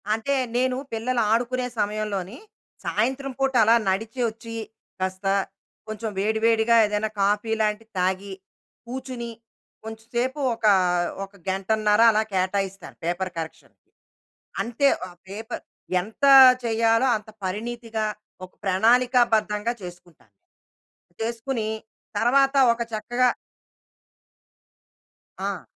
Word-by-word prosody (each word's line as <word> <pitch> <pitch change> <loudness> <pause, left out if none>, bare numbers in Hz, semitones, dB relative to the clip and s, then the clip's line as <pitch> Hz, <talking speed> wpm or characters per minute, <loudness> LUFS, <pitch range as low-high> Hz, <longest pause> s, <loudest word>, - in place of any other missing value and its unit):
అంటే, 225 +6 -1 0.2
నేను 255 0 +1 0.2
పిల్లలు 235 +2 0
ఆడుకునే 250 +2 0
సమయంలో‌‌ని, 205 0 -2 0.5
సాయంత్రం 265 +5 -1
పూట 270 0 +1
అలా 225 +2 +5
నడిచి 220 +6 -2
ఒచ్చి, 230 +1 -10 0.4
కాస్త 185 +1 -3 0.6
కొంచెం 215 +1 -4
వేడివేడిగా 220 +2 +2
ఏదైనా 210 +1 -1
కాఫీ 205 +3 +1
లాంటిది 215 +1 -1
తాగి, 190 +2 -1 0.5
కూచుని, 245 -1 -6 0.5
కొంచె 220 0 -9
సేపు 255 +4 0 0.2
ఒక 225 - -5 0.6
ఒక 195 +1 -10 0.2
గంటన్నర 210 +3 +2
అలా 215 0 +2
కేటాయిస్తాను 195 +1 -2
పేపర్ 175 +2 -2
కరెక్షన్‌కి. 160 -1 -9 0.7
అం‌తే. 240 +4 +2 0.2
ఆ - - -13 0.2
పేపర్ 220 +4 -6 0.4
ఎంత 220 +9 -3 0.4
చేయాలో 230 +2 +3
అంత 215 0 -13 0.2
పరిణితిగా, 225 +3 -3 0.4
ఒక 185 - -21
ప్రణాళికాబద్ధంగా 225 +1 +3
చేసుకుంటాను. 175 - -13 0.9
చేసుకుని, 230 0 -3 0.5
తర్వాత 270 +5 +3 0.2
ఒక 235 - -7
చక్కగా 240 +4 +1 2.1
ఆ! - - -3
220 Hz, 100 wpm, -24 LUFS, 205-240 Hz, 2.1 s, అలా